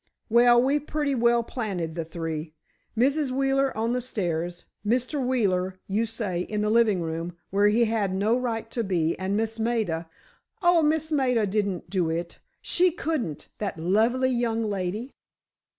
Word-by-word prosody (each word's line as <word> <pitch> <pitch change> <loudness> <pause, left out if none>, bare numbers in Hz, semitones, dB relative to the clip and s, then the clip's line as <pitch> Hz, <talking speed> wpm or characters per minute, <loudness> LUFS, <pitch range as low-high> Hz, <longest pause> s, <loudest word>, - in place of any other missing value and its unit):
"Well, 240 +1 +6
we've 280 +4 +1
pretty 295 -2 0
well 235 -1 +3
planted 195 -10 -3
the 165 0 -3
three. 160 -1 -5 0.4
Mrs. 280 +4 +2
Wheeler 270 +1 +1
on 230 +2 0
the 250 - 0
stairs, 175 -7 -3 0.2
Mr. 250 +6 0
Wheeler, 190 -7 0
you 215 +4 0
say, 205 -6 -2
in 210 +3 -2
the 210 0 +1
living 220 -5 +3
room, 165 +2 -4
where 200 +2 +4
he 230 +3 +4
had 215 -3 0
no 205 +5 +2
right 230 -3 -2
to 235 - -1
be, 170 -5 0
and 190 +2 -1
Miss 225 +1 -2
Maida——" 215 -8 -1 0.5
"Oh, 350 -1 +5
Miss 315 +1 +1
Maida 250 -7 +2
didn't 200 -3 -1
do 180 -4 +1
it! 170 +1 -4 0.2
She 365 +1 +3
couldn't! 305 - -3
That 200 -5 -3
lovely 225 +10 +2
young 235 -2 0
lady!" 205 +4 -3
220 Hz, 160 wpm, -26 LUFS, 185-250 Hz, 0.5 s, Well